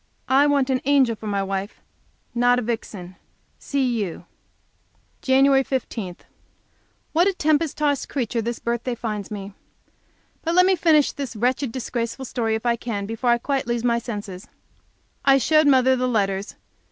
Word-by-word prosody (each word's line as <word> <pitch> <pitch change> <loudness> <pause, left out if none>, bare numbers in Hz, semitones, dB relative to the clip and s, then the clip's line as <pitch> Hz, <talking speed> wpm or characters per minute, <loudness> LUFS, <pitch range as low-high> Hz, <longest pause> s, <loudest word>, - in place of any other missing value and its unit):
I 275 +2 +5
want 280 -2 +2
an 255 - 0
angel 270 -5 +3
for 215 - -9
my 200 -1 0
wife, 195 +1 -4 0.5
not 245 +1 +3
a 250 - -1
vixen. 205 -5 -5 0.4
C. 280 -1 -1 0.2
U." 175 -2 -7 1.0
Jan. 270 +1 +4
15 225 -9 -4 1.0
What 340 +4 +4
a 395 - +2
tempest 310 -2 +1
tossed 290 -2 0
creature 240 -4 -2
this 235 +1 -3
birthday 235 +1 -2
finds 215 -4 -4
me. 200 -1 -7 0.9
But 330 +1 -1
let 365 0 +6
me 380 0 +4
finish 320 -4 +3
this 275 -5 -6
wretched, 250 +3 0
disgraceful 240 +1 -4
story, 225 -3 -1
if 220 +2 -5
I 235 -1 +3
can, 215 -4 -4
before 225 +4 -2
I 240 - +5
quite 270 +1 -2
lose 235 -1 -1
my 235 -1 +2
senses. 205 -5 -7 0.8
I 275 0 +5
showed 310 +4 +3
my 275 -2 +6
mother 260 +1 +3
the 255 0 0
letters. 200 -4 -1
245 Hz, 165 wpm, -23 LUFS, 220-275 Hz, 1.0 s, let